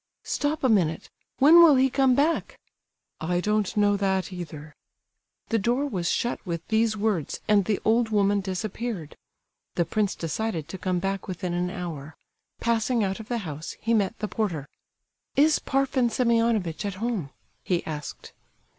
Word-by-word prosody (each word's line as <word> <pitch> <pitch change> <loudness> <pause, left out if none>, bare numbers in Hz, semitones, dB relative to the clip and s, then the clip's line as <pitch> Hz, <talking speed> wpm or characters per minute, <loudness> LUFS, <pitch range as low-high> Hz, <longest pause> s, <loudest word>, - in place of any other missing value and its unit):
"Stop 295 +1 -1
a - - +5
minute! 175 -9 +1 0.3
When 300 +5 +7
will 320 -4 +8
he 260 0 +4
come 265 -1 +3
back?" 300 +5 0 0.6
"I 175 +2 0
don't 210 +1 0
know 205 -1 +4
that 190 -1 0
either." 155 -4 -8 0.8
The 225 - +2
door 240 +7 +1
was 185 -11 -2
shut 240 - -1
with 170 -3 -5
these 220 0 +2
words, 200 -7 -1
and 205 -3 +4
the 210 -3 0
old 225 +1 +3
woman 205 -1 +2
disappeared. 190 -2 -4 0.6
The 170 - +2
prince 210 0 0
decided 165 -1 -3
to 190 - -7
come 185 -1 -1
back 195 +1 -2
within 180 -1 -3
an 175 +1 -1
hour. 165 -6 -6 0.4
Passing 235 0 +1
out 195 +1 -2
of 220 - -9
the 240 - -1
house, 155 0 -6
he 230 - 0
met 215 0 +1
the 215 - -3
porter. 175 -11 -2 0.7
"Is 305 +2 +4
Parfen 265 -2 +1
Semionovitch 230 -8 +1
at 200 -2 -3
home?" 210 - -2 0.3
he 175 -2 -1
asked. 150 -2 -7
205 Hz, 160 wpm, -26 LUFS, 180-235 Hz, 0.8 s, will